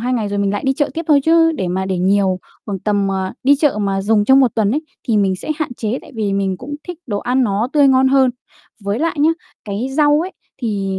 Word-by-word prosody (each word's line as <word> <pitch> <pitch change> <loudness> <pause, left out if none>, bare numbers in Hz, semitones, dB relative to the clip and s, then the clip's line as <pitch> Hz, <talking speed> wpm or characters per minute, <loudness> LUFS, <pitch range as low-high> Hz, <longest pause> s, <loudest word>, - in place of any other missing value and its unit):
2 250 +2 -1
ngày, 225 -4 -1
rồi 205 0 -3
mình 200 -1 +1
lại 205 - -3
đi 265 - +3
chợ 290 +1 -1
tiếp 330 - -2
thôi, 290 -2 +5
chứ 325 0 +4
để 190 - -3
mà 190 +2 -2
để 190 -1 -2
nhiều 190 0 +2 0.3
khoảng 200 -3 -3
tầm, 200 0 0
ờ, 190 -1 -2
đi 285 +2 +5
chợ 285 -6 +1
mà 195 -1 -1
dùng 210 +1 +2
trong 265 +4 +6
1 255 -4 +2
tuần 215 -3 +1
ấy, 295 +7 -1 0.3
thì 225 - +2
mình 195 -2 +2
sẽ 245 - -7
hạn 295 -6 -3
chế, 225 +2 -3
tại 295 - -15
vì 210 -3 -1
mình 195 -1 -1
cũng 275 +8 -7
thích 355 -2 -6
đồ 205 -5 -2
ăn 250 +4 0
nó 210 +2 0
tươi 290 -2 +5
ngon 265 0 +4
hơn. 265 -1 +4 0.5
Với 200 +3 -1
lại 325 +3 -1
nhá, 310 +2 +5 0.3
cái 210 +4 -3
rau 295 -1 +4
ấy, 375 - -7 0.3
thì 195 -4 -2
220 Hz, 260 wpm, -18 LUFS, 200-275 Hz, 0.5 s, trong